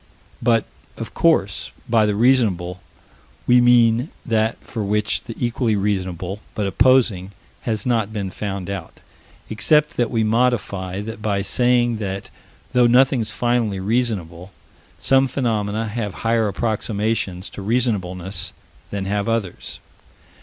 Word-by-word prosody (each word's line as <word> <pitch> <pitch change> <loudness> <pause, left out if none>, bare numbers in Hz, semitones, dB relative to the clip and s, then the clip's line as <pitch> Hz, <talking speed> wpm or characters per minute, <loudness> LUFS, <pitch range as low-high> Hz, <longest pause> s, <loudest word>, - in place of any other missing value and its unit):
But, 115 -1 +3 0.3
of - - -6
course, - - +2 0.2
by 110 -2 +3
the 105 - 0
reasonable 100 -7 +2 0.6
we 125 0 +5
mean 120 +2 +4 0.2
that 110 -2 +1
for 110 - -4
which 105 +1 0
the 115 - -7
equally 120 -2 0
reasonable, 95 -2 -2 0.2
but 105 - -1
opposing, 105 -4 +3 0.4
has 110 -2 -2
not 115 -4 +1
been 100 -4 -4
found 100 -2 -4
out 95 -4 -6 0.5
except 150 +7 +2
that 120 - +1
we 115 -2 +1
modify 105 -5 0
that 110 0 -7
by 100 -2 0
saying 120 +2 +2
that, 95 -2 -5 0.4
though 125 -1 +5
nothing's 125 -2 +3
finally 115 -2 0
reasonable, 95 -5 -2 0.5
some 135 0 +4
phenomena 110 -4 -1
have 105 -4 -4
higher 115 -1 +2
approximations 105 -2 -2
to - - -8
Reasonableness 100 -5 -1 0.4
than 100 -1 -3
have 100 +2 -1
others. 115 -6 -3
110 Hz, 125 wpm, -21 LUFS, 100-120 Hz, 0.6 s, we